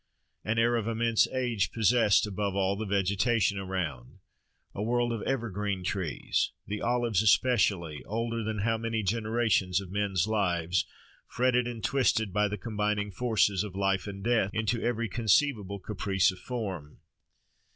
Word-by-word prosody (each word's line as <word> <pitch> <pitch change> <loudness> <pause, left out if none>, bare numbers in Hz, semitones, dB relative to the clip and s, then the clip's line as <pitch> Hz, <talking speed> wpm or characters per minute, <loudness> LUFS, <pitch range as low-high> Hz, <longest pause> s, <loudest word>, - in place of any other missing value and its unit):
An 115 +2 -1
air 120 +1 +3
of 110 -1 -2
immense 115 0 +2
age 120 -6 -1
possessed, 115 -2 +3
above 100 -1 -3
all, 100 0 +1
the 110 +1 -4
vegetation 100 +2 +1
around—a 90 -2 -7
world 120 +2 +1
of 115 - -4
evergreen 105 -7 -2
trees—the 95 +3 -2
olives 120 -4 +1
especially, 100 - +2
older 115 +1 -2
than 105 -1 -3
how 115 +1 0
many 115 -1 -2
generations 110 -3 +1
of 95 -2 -9
men's 100 -4 0
lives! 90 -5 0 0.4
fretted 125 -1 +1
and 115 -2 -6
twisted 115 -6 +1
by 105 0 +2
the 105 +1 -4
combining 105 0 -2
forces 105 -4 +1
of 100 -3 -7
life 95 0 0
and 100 -1 -7
death, 115 -4 +2
into 110 +1 0
every 115 -1 -1
conceivable 110 -1 +1
caprice 95 -1 0
of 90 - -12
form. 95 -13 -6
105 Hz, 140 wpm, -29 LUFS, 95-115 Hz, 0.4 s, air